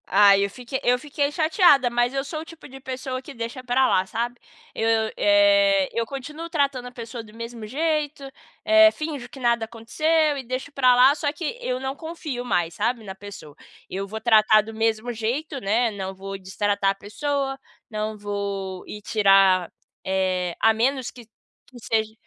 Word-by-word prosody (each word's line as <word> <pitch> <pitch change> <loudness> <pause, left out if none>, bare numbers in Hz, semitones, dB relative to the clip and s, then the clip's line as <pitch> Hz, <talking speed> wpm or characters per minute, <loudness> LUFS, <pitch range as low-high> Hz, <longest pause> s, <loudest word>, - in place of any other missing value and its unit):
Ai, 200 0 +6
eu 200 - -1
fique 250 +5 -5
eu 250 0 +3
fiquei 285 +1 -2
chateada, 310 - +4
mas 240 +1 +1
eu 270 0 -1
sou 310 +2 -5
o - - -9
tipo 330 -1 -13
de 270 -1 -11
pessoa 260 0 -5
que 275 - -11
deixa 235 +1 -6
pra 255 +1 +2
lá, 185 0 +2
sabe. 240 +4 -4 0.3
Eu, 225 0 +1
eh, 300 -1 +4
eu 230 0 -1
continuo 300 +6 -7
tratando 280 -6 0
a - - -9
pessoa 235 -1 -8
do 215 -1 -16
mesmo 230 0 -7
jeito, 300 +2 -1 0.4
eh, 325 0 +7
finjo 300 -6 -6
que 270 - -12
nada 235 -2 +1
aconteceu 295 +7 0
e 270 - -5
deixo 255 +4 -5
pra 255 -3 +4
lá, 260 +3 +6
só 290 -1 -1
que 325 +8 -5
eu 255 - -2
não 265 +1 -4
confio 315 -6 -6
mais, 175 -9 0
sabe, 230 +3 -1
na 190 -2 -8
pessoa. 195 -7 -11 0.3
Eu 195 +1 -4
vou 220 +2 -6
tratar 215 -2 +5
do 225 +2 -9
mesmo 225 +2 -1
jeito, 260 +7 -3
né, 225 +3 +1
não 190 -2 -5
vou 195 +1 -7
destratar 195 +1 0
a - - -5
pessoa, 270 +6 -3 0.3
não 215 -1 -3
vou 200 -2 -4
ir 210 - -8
tirar 195 -4 +4 0.3
eh, 185 -2 -1
a 225 0 +5
menos 255 +3 0
que 240 -3 -14 0.5
seja 220 -1 -1
240 Hz, 180 wpm, -24 LUFS, 210-280 Hz, 0.5 s, eh